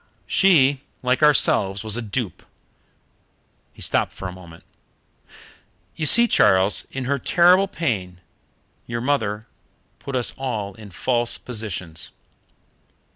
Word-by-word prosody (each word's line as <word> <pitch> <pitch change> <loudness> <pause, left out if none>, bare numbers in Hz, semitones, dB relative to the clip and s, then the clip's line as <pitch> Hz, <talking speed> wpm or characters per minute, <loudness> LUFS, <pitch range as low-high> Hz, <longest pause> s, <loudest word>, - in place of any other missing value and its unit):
She, 145 -8 +4 0.2
like 125 +2 +1
ourselves, 100 -9 +2
was 110 -1 0
a 120 - 0
dupe 115 -1 -4 0.7
" - - -42
He - - -7
stopped - - 0
for 95 - -7
a - - -6
moment. 85 -2 -14 1.3
"You 155 - -2
see, 235 +7 +6
Charles, 95 - +3
in 135 -1 -5
her 140 +2 -1
terrible 180 +6 +4
pain 95 - -3 0.7
your 115 0 -3
poor 120 - -6
mother 110 -6 -1 0.5
put 140 - -6
us 125 -2 -1
all 110 -7 -3
in 105 +1 -12
false 120 +5 0
positions. 95 -8 -5
120 Hz, 130 wpm, -22 LUFS, 100-140 Hz, 1.3 s, see